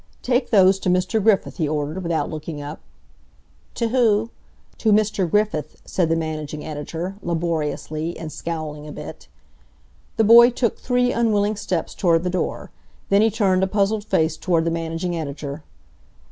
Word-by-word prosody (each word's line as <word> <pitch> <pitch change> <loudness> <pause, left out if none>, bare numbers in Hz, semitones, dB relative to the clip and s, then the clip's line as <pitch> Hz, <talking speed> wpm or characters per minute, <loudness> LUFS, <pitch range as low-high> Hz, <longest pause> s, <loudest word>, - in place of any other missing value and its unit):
"Take 250 +1 +1
those 195 -2 +5
to 185 - -1
Mr. 185 +4 +1
Griffith," 205 -2 +2
he 160 -4 0
ordered 155 +4 -2
without 170 -2 -1
looking 155 -1 -6
up. 145 +2 -7 1.0
"T' 230 -1 -1
who?" 225 -2 +2 0.5
"To 220 - +2
Mr. 205 -4 +2
Griffith," 180 -7 0
said 175 -3 0
the 165 - +2
managing 155 -2 -4
editor, 160 +5 -5
laboriously, 165 -1 -2
and 160 -1 -7
scowling 155 -3 -5
a - - -7
bit. - - -9 0.9
The 225 - +4
boy 235 +2 +8
took 245 -2 -1
three 245 0 +1
unwilling 215 -2 +1
steps 185 -5 -3
toward 165 -2 +2
the 180 - -1
door. 185 - -3 0.4
Then 200 +1 +4
he 220 - +4
turned 195 -4 +1
a 190 - +2
puzzled 205 +2 0
face 160 -6 +1
toward 165 -1 +1
the 165 - +1
managing 165 +1 -3
editor. 145 -1 -5
175 Hz, 160 wpm, -22 LUFS, 160-210 Hz, 1.0 s, boy